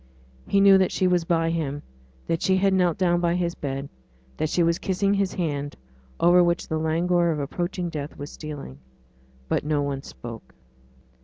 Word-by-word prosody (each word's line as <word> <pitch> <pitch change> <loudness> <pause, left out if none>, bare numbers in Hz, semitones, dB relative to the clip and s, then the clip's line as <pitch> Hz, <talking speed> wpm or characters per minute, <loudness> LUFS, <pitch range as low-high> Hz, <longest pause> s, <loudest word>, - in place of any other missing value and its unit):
He 200 - +3
knew 195 -1 +7
that 190 - +2
she 185 - 0
was 180 -2 +2
by 165 -1 +1
him; 145 -3 -3 0.4
that 165 0 -1
she 190 0 +3
had 195 0 +3
knelt 180 -3 +2
down 175 -2 +2
by 170 0 +1
his 175 -1 -1
bed; 135 -2 -4 0.5
that 155 - -1
she 175 - +2
was 170 0 +1
kissing 195 +1 0
his 195 -2 0
hand, 145 -5 -2 0.4
over 175 +1 +6
which 170 0 0
the 160 - -1
languor 170 +2 +1
of 155 -2 -1
approaching 175 +5 -3
death 150 -3 -6
was 145 0 -7
stealing. 145 - -8 0.7
But - - 0
no 150 -1 0
one 140 -1 -3
spoke. 115 -4 -10
170 Hz, 180 wpm, -25 LUFS, 150-180 Hz, 0.7 s, knew